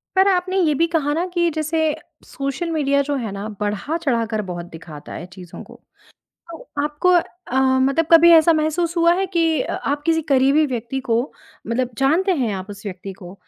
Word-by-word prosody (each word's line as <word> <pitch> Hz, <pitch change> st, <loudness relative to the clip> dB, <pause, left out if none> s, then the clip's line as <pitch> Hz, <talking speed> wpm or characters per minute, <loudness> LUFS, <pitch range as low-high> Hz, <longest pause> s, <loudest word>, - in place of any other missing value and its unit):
पर 380 Hz, +1 st, +4 dB
आपने 370 Hz, 0 st, +1 dB
ये 315 Hz, -4 st, +2 dB
भी 335 Hz, -, +4 dB
कहा 310 Hz, -3 st, 0 dB
ना 335 Hz, +4 st, -1 dB
कि 345 Hz, -1 st, +2 dB
जैसे 310 Hz, +1 st, -2 dB, 0.5 s
सोशल 275 Hz, +5 st, -4 dB
मीडिया 280 Hz, -3 st, +1 dB
जो 290 Hz, -, -1 dB
है 235 Hz, -6 st, -3 dB
ना, 200 Hz, +2 st, -5 dB
बढ़ा-चढ़ाकर 230 Hz, 0 st, -1 dB
बहुत 175 Hz, -1 st, -5 dB
दिखाता 155 Hz, -2 st, -10 dB
है 175 Hz, -, -7 dB
चीज़ों 180 Hz, -3 st, -11 dB
को। -, -, -15 dB, 0.8 s
तो 330 Hz, -, -8 dB, 0.3 s
आपको 300 Hz, +4 st, 0 dB, 0.4 s
अ, 250 Hz, -, -4 dB, 0.2 s
मतलब 275 Hz, +5 st, +2 dB
कभी 335 Hz, +1 st, +8 dB
ऐसा 330 Hz, 0 st, +6 dB
महसूस 315 Hz, +2 st, 0 dB
हुआ 340 Hz, 0 st, +4 dB
है 385 Hz, +1 st, 0 dB
कि 325 Hz, -3 st, +2 dB
अ, -, -, -4 dB
आप 285 Hz, +1 st, -2 dB
किसी 325 Hz, -1 st, +2 dB
करीबी 275 Hz, +4 st, +4 dB
व्यक्ति 250 Hz, -1 st, -4 dB
को 230 Hz, +1 st, +3 dB, 0.5 s
मतलब 245 Hz, +2 st, -1 dB
जानते 325 Hz, +9 st, +2 dB
हैं 225 Hz, -4 st, 0 dB
आप 190 Hz, +2 st, -7 dB
उस 205 Hz, +1 st, -10 dB
व्यक्ति 195 Hz, 0 st, -7 dB
को, 180 Hz, -1 st, -12 dB
285 Hz, 185 wpm, -20 LUFS, 225-330 Hz, 0.8 s, कभी